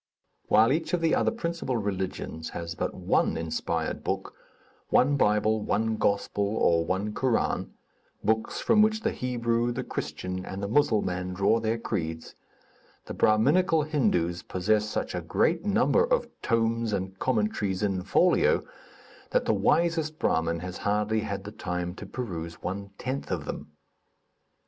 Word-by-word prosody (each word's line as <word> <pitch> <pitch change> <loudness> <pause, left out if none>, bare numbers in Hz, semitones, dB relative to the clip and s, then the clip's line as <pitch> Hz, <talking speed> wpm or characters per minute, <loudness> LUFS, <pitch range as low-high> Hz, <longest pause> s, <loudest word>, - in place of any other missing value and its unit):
While 110 +3 +5
each 160 +3 -2
of 175 - -3
the 165 -1 +2
other - - +3
principal 170 - -2
religions 95 -5 -3
has 85 0 -4
but - - -3
one - - +1
inspired 80 -1 -2
book, - - -3 0.6
one 140 +3 +4
Bible, 105 -3 +2
one 110 +1 0
Gospel, 100 0 0
or 85 -1 +3
one 95 +5 -2
Koran 130 -1 0 0.5
books 110 +1 0
from 220 -2 +4
which 220 0 +3
the - - 0
Hebrew, 120 -1 0
the 125 +2 -3
Christian 90 -5 -4
and 95 +2 -6
the - - -1
Musselman 95 -7 +1
draw 100 +4 +3
their 115 +1 0
creeds 80 -7 -4 0.7
the - - -6
Brahminical 150 +9 +3
Hindus 100 - 0
possess 105 +3 0
such - - -3
a - - -2
great 170 +3 +1
number 210 - +3
of - - +1 0.2
tomes 115 -1 +1
and 95 -1 -3
commentaries 105 -5 0
in 95 -3 0
folio 180 - +3 0.6
that - - +1
the - - +2
wisest 160 -2 +1
Brahmin 85 - 0
has 90 0 -6
hardly 105 +1 0
had 100 -3 -4
the 105 - -7
time 90 -4 -3
to 105 - -8
peruse 85 -8 -5
one 100 +2 -4
tenth 130 +2 -4
of 85 -6 -2
them. - - -7
110 Hz, 150 wpm, -27 LUFS, 95-130 Hz, 0.7 s, While